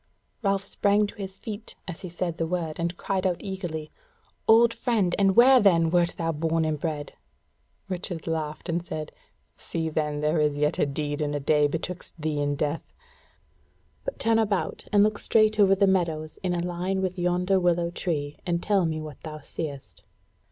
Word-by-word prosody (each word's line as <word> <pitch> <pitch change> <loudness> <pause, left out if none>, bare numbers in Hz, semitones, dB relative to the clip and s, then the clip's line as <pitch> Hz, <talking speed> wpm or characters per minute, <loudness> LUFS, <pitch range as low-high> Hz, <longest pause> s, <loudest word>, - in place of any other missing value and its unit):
Ralph 195 -2 +1
sprang 205 +1 +2
to 205 - -8
his 195 -1 -6
feet 215 0 -8
as 175 -3 -6
he 185 - -6
said 175 -1 -3
the 165 - -1
word, 165 -2 -3
and 170 +1 -2
cried 190 -1 0
out 180 -2 -2
eagerly: 175 -6 -5 0.6
"Old 230 +1 +6
friend, 210 -8 +1
and 195 -1 +4
where 255 +2 +8
then 165 -6 +4
wert 175 -1 +2
thou 165 -1 0
bred 160 +1 0
and 155 -1 -1
born?" 150 -2 -2 0.8
Richard 180 -3 -5
laughed 155 -1 -3
and 170 0 -1
said: 155 -3 -5 0.5
"See, 165 -1 -3
then, 150 -1 -1
there 155 +2 +2
is 150 -1 +1
yet 150 +1 +1
a - - +3
deed 145 +1 -3
and 145 -1 -1
a - - 0
day 150 +1 +3
betwixt 170 +3 -5
thee 150 -1 -1
and 145 0 0
death! 150 +2 -2 1.1
But - - -4
turn 225 0 +3
about 205 -3 -1
and 205 -1 +6
look 210 0 +1
straight 215 -1 +3
over 195 -1 +6
the 200 +1 +4
meadows 165 -5 0
in 180 -2 0
a 170 0 -1
line 180 +2 -1
with 185 0 -2
yonder 180 +2 +2
willow 175 -1 +1
tree, 150 -5 -3
and 175 -1 -1
tell 195 -4 +2
me 155 -1 -2
what 155 -3 -8
thou 155 -1 -7
seest." 140 - -7
170 Hz, 185 wpm, -26 LUFS, 155-195 Hz, 1.1 s, where